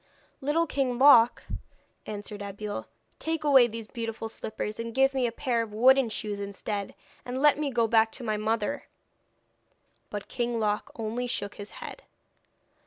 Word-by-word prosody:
'Little 300 +5 +2
King 265 -5 -1
Loc,' 245 -3 +7 0.6
answered 205 0 -6
Abeille, 205 +1 -5 0.3
'take 320 -1 -2
away 270 -5 +6
these 230 -1 -6
beautiful 225 -2 -5
slippers 215 -1 -5
and 230 0 -5
give 270 +1 +4
me 260 -2 +1
a - - -3
pair 235 -1 0
of 220 -2 -6
wooden 260 +2 +5
shoes 210 -2 -4
instead, 200 0 -4 0.3
and 250 +1 -4
let 295 +1 +5
me 300 -2 0
go 240 -3 +2
back 225 0 +3
to 255 - -7
my 215 -2 0
mother.' 215 0 -1 1.2
But 205 -1 -6
King 240 -2 -2
Loc 210 -1 0
only 230 +2 -3
shook 200 -4 -2
his 205 0 -9 0.2
head. - - -8
230 Hz, 160 wpm, -28 LUFS, 215-260 Hz, 1.2 s, Loc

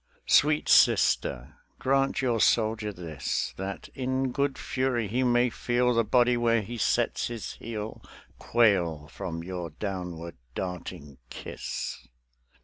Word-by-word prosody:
Sweet 150 +1 +4
Sister, - - +3 0.2
grant 135 0 +1
your 120 -3 +1
soldier 110 -1 +2
this; 85 -6 -3
That 95 +1 -5
in 130 0 -1
good 140 +1 0
fury 130 -4 -1
he 120 +6 0
may 120 -1 +3
feel 125 +2 +1
The 115 0 +3
body 120 +1 +3
where 115 -2 +2
he 120 +3 -6
sets - - +1
his 120 -3 -5
heel 110 -1 -6 0.4
Quail 90 -10 +2
from 85 -4 -5
your 90 -1 -5
downward 90 -1 -5 0.2
darting 90 -6 -6
kiss. - - -6
110 Hz, 125 wpm, -28 LUFS, 90-125 Hz, 0.4 s, Sweet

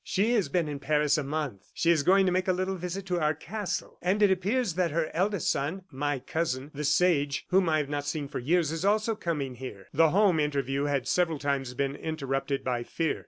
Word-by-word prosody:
"She 205 +5 +1
has 215 -6 +1
been 175 -3 +1
in 145 -1 -4
Paris 150 0 +2
a - - -2
month. 140 -8 -4
She 170 - +3
is 160 -3 +3
going 190 +6 +4
to 185 - +2
make 185 +1 0
a 185 - +3
little 185 +1 -1
visit 180 +2 -5
to 180 -2 -1
our 155 -1 +1
castle. 200 +5 -5
And 195 +4 +2
it 200 - +5
appears 200 +3 +1
that 180 0 +1
her 160 0 -1
eldest 190 +1 +1
son 160 +8 -2
my 145 +1 -1
cousin, 145 -2 -3
'The 150 +1 -4
Sage,' 145 -2 +2
whom 185 -2 +3
I 155 - +3
have 150 -2 -1
not 145 -1 -2
seen 145 -1 -2
for 140 -1 -5
years 155 +4 +1
is 165 +1 -3
also 215 +3 +2
coming 155 - -3
here." 120 -6 -9
The 160 +2 +5
home 190 -2 +3
interview 140 -2 0
had 140 -4 -1
several 170 -1 +1
times 135 -3 -2
been 140 +1 -1
interrupted 140 -3 -2
by 125 -2 -1
fear. 160 +6 -2
155 Hz, 225 wpm, -28 LUFS, 140-180 Hz, -, it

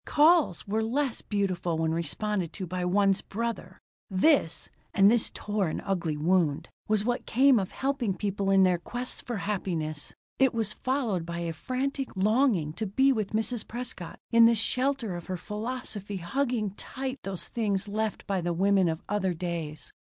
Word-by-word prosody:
"Calls" 305 - +4
were 215 +2 0
less 250 +3 -1
beautiful 185 -5 -1
when 160 0 +1
responded 170 +3 -1
to 190 - -5
by 180 +1 -3
one's 195 +2 +3
brother! 215 -4 -4 0.3
This 190 - +2 0.3
(and 200 +1 +7
this 235 -2 +2
tore 205 -3 -1
an 155 - -3
ugly 170 -6 -1
wound) 160 -2 +1 0.2
was 215 -1 +1
what 245 0 -1
came 260 0 +5
of 190 -1 -2
helping 265 -7 -1
people 200 -1 -1
in 195 -1 +6
their 180 -2 +3
quests 245 +8 -4
for 240 -3 -4
happiness. 165 -6 -3 0.2
It 265 -3 +4
was 220 -2 0
followed 250 -9 -1
by 170 +1 -5
a 165 -1 -2
frantic 265 - -3
longing 210 - +2
to 220 +5 -3
be 265 +8 +3
with 215 -3 -3
Mrs. 225 +1 -1
Prescott 240 -7 -5
in 230 0 +8
the 230 - +4
shelter 250 -2 0
of 175 - -7
her 185 - -3
philosophy, 210 0 -5
hugging 225 +3 -1
tight 260 +6 -5
those 195 -2 -4
things 205 -4 -1
left 215 +1 -2
by 195 -2 -1
the 175 0 -1
women 190 0 +3
of 160 0 -3
other 190 -3 0
days. 165 -3 -4
205 Hz, 170 wpm, -28 LUFS, 180-235 Hz, 0.3 s, in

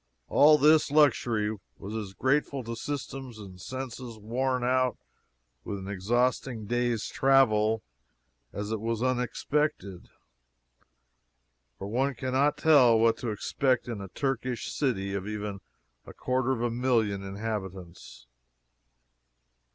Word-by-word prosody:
All 150 +1 +6
this 150 +1 +5
luxury 120 -8 +2 0.2
was 100 +2 -8
as 100 -3 -5
grateful 140 0 0
to 115 0 -5
systems 135 -1 -6
and 95 -4 -11
senses 130 -2 -6
worn 125 +4 -1
out 130 0 +1 0.7
with 100 - -4
an 95 0 -8
exhausting 115 +3 -1
day's 120 0 0
travel, 110 -5 +3 0.7
as 105 +2 -5
it 110 - -1
was 115 +1 -2
unexpected 125 - -1 1.7
for - - -7
one 130 +6 0
can 130 +2 -4
not 140 +3 +2
tell 130 -8 +6
what 115 0 +4
to 120 - -4
expect 125 +6 0
in 115 -4 -5
a 100 - -6
Turkish 130 +2 -3
city 100 -9 -1
of 100 0 -3
even 105 -2 -4 0.5
a - - -10
quarter 130 0 0
of 120 -3 -1
a 120 - 0
million 115 -5 +1
inhabitants. 95 - -6
120 Hz, 125 wpm, -28 LUFS, 105-130 Hz, 1.7 s, All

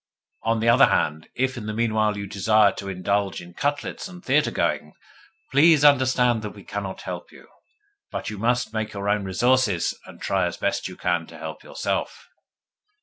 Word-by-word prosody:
On 115 0 +1
the 115 - 0
other 120 +2 +7
hand, 80 +1 0
if, 130 0 0
in 105 -3 -6
the 110 - -3
meanwhile, 110 -2 +1
you 100 - -4
desire 105 +1 +3
to 100 +1 -7
indulge 95 +1 -1
in 85 0 -12
cutlets 145 - -2
and 180 -1 -12
theatre 150 +3 +3
going, - - -1 0.6
please 150 +1 +6
understand 130 -4 +4
that 105 -1 -7
we 100 - -12
cannot 100 -2 -5
help - - -7
you, - - -16 0.6
but - - -4
you 105 - -7
must 120 0 0
make 110 -1 -3
your 100 0 -4
own 105 -1 +1
resources, 115 -1 +2
and - - -13
try 95 -2 0
as 85 - -5
best 100 - -1
you 90 - -9
can 85 -2 -1
to 80 - -12
help 80 0 -7
yourself. - - -3
110 Hz, 185 wpm, -24 LUFS, 95-125 Hz, 0.6 s, other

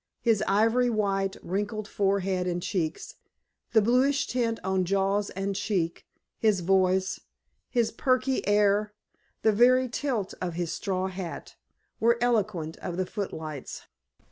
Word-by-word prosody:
His 225 -3 +3
ivory 225 +5 +3
white, 195 -3 0
wrinkled 205 +3 -3
forehead 195 -3 0
and 175 0 -1
cheeks, 165 -5 -2 0.6
the 220 -3 +5
bluish 260 +5 +3
tint 235 -2 -1
on 190 0 +1
jaws 195 +2 +1
and 195 +1 -3
chin, 185 -5 0 0.5
his 210 -4 +2
voice, 190 +1 +2 0.5
his 235 -3 +1
perky 255 +2 +1
air, 205 0 +3 0.5
the 220 - +5
very 255 +4 +5
tilt 240 -5 -2
of 175 -3 -3
his 170 -1 -2
straw 190 -2 -2
hat, 185 -2 -6 0.4
were 235 +1 +3
eloquent 210 -9 0
of 175 - -5
the 185 - 0
footlights. 160 - -6
200 Hz, 130 wpm, -27 LUFS, 185-230 Hz, 0.6 s, the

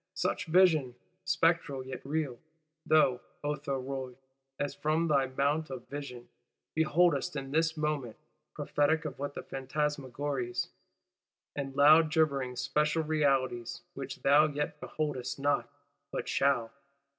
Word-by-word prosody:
Such - - -1
vision 160 -7 +4 0.3
(spectral 165 -7 +1
yet 130 -1 -7
real) 140 -3 -2 0.5
thou, 135 -5 +4 0.2
O 145 0 0
Thuriot, 135 -2 -4 0.4
as 145 - -1
from 155 +2 0
thy 140 -3 +3
Mount 145 +4 0
of 130 -2 -7
Vision, 140 -4 -7 0.5
beholdest 160 0 +2
in 135 -1 -5
this 160 +2 +1
moment: 150 -7 -2 0.4
prophetic 155 +2 +1
of 135 -4 -5
what 145 0 -4
other - - -4
Phantasmagories, 135 -2 -2 0.9
and 135 -2 -4
loud 155 +3 +7
gibbering 140 -6 +1
Spectral 150 +5 +1
Realities, 135 -1 0
which, 135 - -7
thou 145 +3 +6
yet 150 0 -3
beholdest 145 -5 -3
not, 145 +1 0 0.4
but - - -3
shalt! 135 -5 +1
145 Hz, 120 wpm, -31 LUFS, 135-155 Hz, 0.9 s, loud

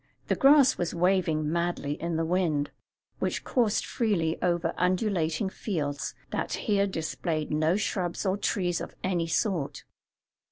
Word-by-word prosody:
The - - +3
grass 275 -1 +6
was 175 -1 -1
waving 170 -4 +2
madly 170 -4 -1
in 170 0 -2
the 165 0 0
wind, 160 -4 0 0.5
which - - -1
coursed 230 -5 +1
freely 180 -9 0
over 175 -2 +1
undulating 180 -2 +1
fields 150 -8 -3 0.2
that - - -2
here 200 -2 +3
displayed 160 -2 -3
no 155 +3 +2
shrubs 185 -3 -2
or 190 0 +2
trees 180 -3 0
of - - -7
any 175 -3 0
sort. 165 -4 -1
175 Hz, 135 wpm, -28 LUFS, 160-195 Hz, 0.5 s, grass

